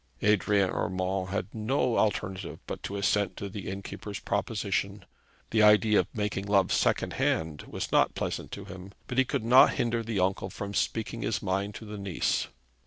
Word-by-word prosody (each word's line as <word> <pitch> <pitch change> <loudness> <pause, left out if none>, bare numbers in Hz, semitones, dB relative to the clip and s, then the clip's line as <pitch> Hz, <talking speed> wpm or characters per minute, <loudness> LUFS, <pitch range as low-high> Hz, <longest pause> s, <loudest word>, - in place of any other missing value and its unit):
Adrian 100 -2 +3
Urmand 95 0 -1
had 100 +1 -3
no 120 +2 0
alternative 95 -6 -1
but - - -6
to 100 - -5
assent 100 -1 +1
to 100 - -4
the 100 -1 -6
innkeeper's 100 +1 -6
proposition. - - -2 0.5
The 110 - +3
idea 105 0 +6
of - - +1
making 105 -2 -2
love 100 -2 +3
second - - +1
hand 80 -2 0
was - - -5
not - - +3
pleasant - - -3
to - - -6
him; 95 +1 -10
but 125 0 -1
he 130 - +5
could 110 - -2
not 125 +3 +7
hinder 115 -1 0
the 115 -3 -2
uncle 95 +1 0
from 100 +2 -6
speaking 115 +2 -1
his 105 -3 -1
mind 100 +1 -1
to 110 - -8
the 105 -1 -7
niece. 95 -4 0
100 Hz, 175 wpm, -28 LUFS, 95-110 Hz, 0.5 s, not